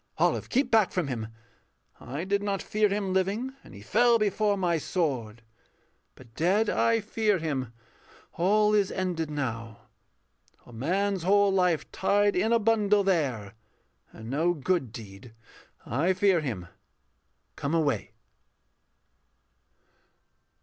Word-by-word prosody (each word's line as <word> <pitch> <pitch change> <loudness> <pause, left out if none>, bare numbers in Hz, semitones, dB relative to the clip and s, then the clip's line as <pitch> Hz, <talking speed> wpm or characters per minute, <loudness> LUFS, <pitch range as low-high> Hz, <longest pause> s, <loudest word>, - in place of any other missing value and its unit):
Olive, - - +1
keep 260 -1 +1
back 220 -4 +4
from 175 -6 -2
him! 115 -4 -4 0.7
I 140 +6 -6
did 200 +2 0
not 200 -1 -1
fear 210 0 +1
Him 195 -1 -2
living, 200 +8 -1
and - - -14
he 100 - -11
fell 235 - +4
before 210 -1 +1
my 175 -3 0
sword; 125 - -2 0.7
But 120 -3 -17
dead 195 - +1
I 230 -1 +2
fear 210 -1 0
him. 140 -8 -3 0.6
All 210 +4 +2
is 205 -2 +2
ended 175 -4 -2
now; 115 -7 -4 0.8
A 120 - -15
man's 190 - -1
whole 200 +3 +3
life 180 -4 +1
tied 205 +1 +2
in 220 +5 +1
a 235 - +5
bundle 210 -2 +2
there, 135 - -1 0.6
And 110 - -11
no 165 +5 +1
good 155 -4 -1
deed. 110 +1 -11 0.5
I 160 - +1
fear 185 -1 +3
him. 110 -12 -4 0.9
Come 140 +4 -2
away. 150 -4 0
185 Hz, 130 wpm, -27 LUFS, 135-205 Hz, 0.9 s, a